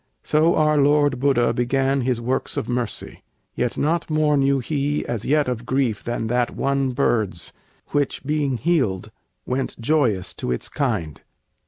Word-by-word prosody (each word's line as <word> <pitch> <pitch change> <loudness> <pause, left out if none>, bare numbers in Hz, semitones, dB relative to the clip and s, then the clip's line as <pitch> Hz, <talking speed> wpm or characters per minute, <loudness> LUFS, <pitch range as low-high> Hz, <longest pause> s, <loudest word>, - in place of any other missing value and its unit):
So 155 +3 +3
our 150 -1 +3
Lord 145 -2 +3
Buddha 130 -3 +2
Began 135 +2 +1
his 125 -1 0
works 125 +3 -2
of - - -2
mercy. 120 -3 -4 0.3
Yet 120 -1 -2
not 165 +4 0
more 155 -1 +2
Knew 140 0 +3
he 145 +2 -1
as 115 -2 -4
yet 150 0 +2
of 125 -2 -2
grief 130 -5 0
than 120 -1 -3
that 120 +1 0
one 140 -1 0
bird's, 110 -9 0 0.4
Which, 145 -2 -1
being 145 -3 0
healed, 110 - 0 0.3
went 130 0 -3
joyous 115 -8 +1
to 60 - -2
its - - -3
kind. 80 -3 -2
135 Hz, 155 wpm, -22 LUFS, 120-145 Hz, 0.4 s, So